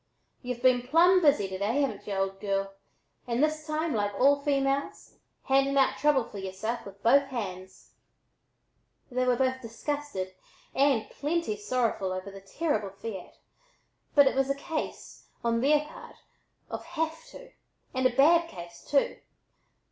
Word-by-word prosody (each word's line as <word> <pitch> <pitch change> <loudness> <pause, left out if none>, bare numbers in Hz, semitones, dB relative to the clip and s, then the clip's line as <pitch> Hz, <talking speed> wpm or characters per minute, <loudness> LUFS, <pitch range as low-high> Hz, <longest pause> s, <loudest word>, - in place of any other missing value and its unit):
y'u've 250 -1 -5
been 255 -1 +5
plumb 355 +6 +5
busy 280 - +4
to 190 0 -6
day, 225 +8 +1
hav'n't 275 - -4
y'u, 200 - -2
old 195 0 -1
girl, 195 -1 -2 0.5
and 240 +3 +1
this 310 0 -1
time, 310 0 -1
like 205 -2 0
all 280 +2 +4
females, 275 -1 -1 0.2
handing 275 +1 +2
out 270 - +4
trouble 295 -4 +3
for 205 - -9
yereself 195 +5 -4
with 200 0 -13
both 275 +4 +5
hands." 190 -7 -7 1.2
They 255 0 0
were 250 - +4
both 260 +1 0
disgusted 230 -4 -4 0.4
and 270 -6 +2
"plenty 300 -5 -1
sorrowful" 210 -3 -1
over 185 +1 -5
the 195 0 -11
terrible 215 -1 -2
fiat, 195 -1 -8 0.8
but 285 -1 +8
it 270 - +2
was 270 0 +1
a 275 - +1
case, 310 +3 -6 0.2
on 230 0 +1
their 295 +3 +4
part, 305 - -12 0.6
of - - -5
"have 325 +3 -3
to," - - -13 0.4
and 260 -1 +3
a 250 - -6
bad 335 +5 +5
case, 170 -1 -10
too. 280 -1 +1
255 Hz, 155 wpm, -28 LUFS, 205-290 Hz, 1.2 s, but